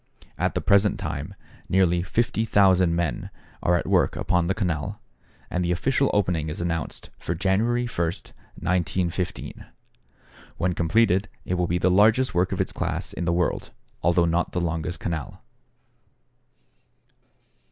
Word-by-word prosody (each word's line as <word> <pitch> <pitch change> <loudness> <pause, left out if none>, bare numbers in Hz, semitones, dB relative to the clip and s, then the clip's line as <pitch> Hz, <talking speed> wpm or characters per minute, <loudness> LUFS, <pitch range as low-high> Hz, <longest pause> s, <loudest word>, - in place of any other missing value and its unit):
At - - -1
the - - 0
present 100 0 +3
time - - -4 0.3
nearly 90 -2 +3
50,000 95 -4 +2
men 85 -7 -2 0.3
are 90 - +3
at 85 - -1
work - - +2
upon 90 -2 +1
the 95 - 0
canal, 85 -8 -2 0.5
and 90 - 0
the 85 - 0
official 135 +10 +1
opening 90 -6 0
is 75 - -5
announced 85 -2 -3
for 85 - -3
January 105 +7 +1
1, 115 - -7
1915. 90 +1 -3 0.9
When 90 +1 0
completed, 95 +3 +2 0.2
it - - -2
will 90 -1 +1
be 85 - 0
the 90 +1 +2
largest 110 +7 +4
work 90 +1 +1
of - - -2
its - - -1
class - - -3
in 85 - -3
the 85 - +1
world, 85 +1 0 0.3
although 85 0 +3
not 85 +1 0
the - - 0
longest 85 0 -2
canal. 80 -5 -5
90 Hz, 140 wpm, -25 LUFS, 85-95 Hz, 0.9 s, largest